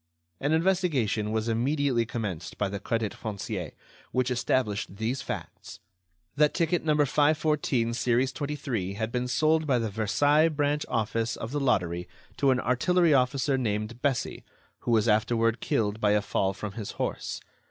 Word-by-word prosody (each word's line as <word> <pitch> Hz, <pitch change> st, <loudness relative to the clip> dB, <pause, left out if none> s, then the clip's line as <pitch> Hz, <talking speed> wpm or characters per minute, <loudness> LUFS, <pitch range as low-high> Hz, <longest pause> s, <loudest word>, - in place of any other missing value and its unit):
An 145 Hz, -, 0 dB
investigation 160 Hz, -, +1 dB
was 110 Hz, 0 st, -1 dB
immediately 125 Hz, +1 st, +1 dB
commenced 100 Hz, -8 st, -4 dB
by 100 Hz, -, 0 dB
the 100 Hz, 0 st, -4 dB
Crédit 110 Hz, +1 st, -2 dB
Foncier, 105 Hz, -4 st, -5 dB, 0.4 s
which 130 Hz, 0 st, 0 dB
established 110 Hz, -5 st, 0 dB
these 115 Hz, +5 st, -2 dB
facts: -, -, -7 dB, 0.6 s
That 150 Hz, 0 st, +3 dB
ticket 170 Hz, 0 st, +1 dB
No. 155 Hz, -1 st, +2 dB
514, 145 Hz, -4 st, +2 dB
series 125 Hz, +2 st, +1 dB
23, 135 Hz, -9 st, -3 dB
had 110 Hz, +2 st, -3 dB
been 125 Hz, +1 st, -1 dB
sold 155 Hz, +4 st, +2 dB
by 130 Hz, -3 st, +3 dB
the 115 Hz, -3 st, -2 dB
Versailles 145 Hz, +10 st, +3 dB
branch 145 Hz, -1 st, 0 dB
office 115 Hz, +1 st, -1 dB
of 110 Hz, -, -6 dB
the 145 Hz, -, -1 dB
Lottery 90 Hz, -10 st, 0 dB, 0.3 s
to 140 Hz, -, +3 dB
an 130 Hz, -1 st, +3 dB
artillery 165 Hz, +7 st, +3 dB
officer 135 Hz, +1 st, +2 dB
named 110 Hz, 0 st, -2 dB
Bessy, 135 Hz, -4 st, -1 dB, 0.4 s
who -, -, -6 dB
was 115 Hz, -1 st, +3 dB
afterward 115 Hz, +2 st, +2 dB
killed 105 Hz, -1 st, 0 dB
by 105 Hz, -1 st, +4 dB
a 105 Hz, -, +3 dB
fall 95 Hz, -1 st, 0 dB
from 105 Hz, 0 st, -5 dB
his 105 Hz, 0 st, -6 dB
horse. -, -, -3 dB
120 Hz, 155 wpm, -27 LUFS, 110-145 Hz, 0.6 s, by